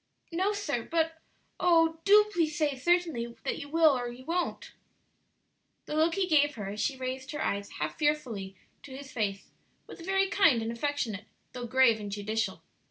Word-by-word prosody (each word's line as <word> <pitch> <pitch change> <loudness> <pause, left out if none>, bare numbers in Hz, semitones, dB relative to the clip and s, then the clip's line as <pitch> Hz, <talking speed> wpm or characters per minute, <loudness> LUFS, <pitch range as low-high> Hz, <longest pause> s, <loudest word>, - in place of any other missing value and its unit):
"No, 375 +5 +1
sir; 320 - -2
but 325 +4 -1 0.4
oh, 330 -2 +3
do 420 +1 +7
please 330 -2 0
say 300 -4 +1
certainly 270 -6 0
that - - -2
you 285 - -8
will 320 -2 +5
or 245 -1 -2
you 245 +2 -11
won't." 345 +3 -2 1.1
The - - -6
look 320 +2 +3
he 390 -1 +1
gave 295 -4 +3
her 205 -3 -5
as 205 +2 -6
she 275 -2 -1
raised 260 +1 -5
her 295 - -2
eyes 200 0 -2
half 150 0 -4
fearfully 250 -11 -1 0.3
to 265 -2 -10
his 275 -1 -10
face 200 -4 -3 0.4
was - - -11
very 385 +2 +2
kind 355 - +4
and 225 - -2
affectionate, 235 -5 -2 0.3
though 245 -1 -5
grave 235 -2 +4
and 205 -1 -6
judicial. 215 +2 -2
285 Hz, 175 wpm, -29 LUFS, 230-330 Hz, 1.1 s, do